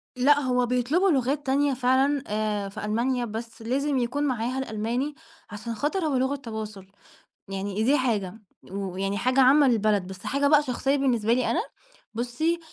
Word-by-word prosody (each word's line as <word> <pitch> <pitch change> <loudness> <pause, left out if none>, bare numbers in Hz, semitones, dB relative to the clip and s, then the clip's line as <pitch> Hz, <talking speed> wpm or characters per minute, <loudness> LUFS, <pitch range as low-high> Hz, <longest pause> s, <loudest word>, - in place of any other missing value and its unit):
لأ، 280 +3 +4
هو 250 -3 +1
بيطلبوا 250 +10 +1
لغات 275 +1 0
تانية 280 +1 +2
فعلًا 265 +3 +2
آآ 210 -1 -1
في 200 - -6
ألمانيا 240 +4 0
بس 225 +1 -7
لازم 270 +5 0
يكون 250 +4 -1
معاها 255 -1 -1
الألماني، 245 +4 -2 0.3
عشان 215 +3 -6
خاطر 310 - -1
هو 295 -3 0
لغة 265 +2 +1
تواصُل، 215 -6 -7 0.6
يعني 195 +2 -3
دي 275 +6 +4
حاجة، 220 -6 -1 0.3
ويعني 195 0 -3
حاجة 255 +4 +2
عامة 275 +2 +6
للبلد 215 -5 +2
بس 190 +1 -10
حاجة 280 +1 +1
بقى 295 0 +5
شخصيّة 270 +1 0
بالنسبة 235 -5 +1
لي 250 +1 +1
أنا، - - +1 0.5
بُصّي، 250 +9 -1
250 Hz, 160 wpm, -26 LUFS, 215-275 Hz, 0.6 s, عامة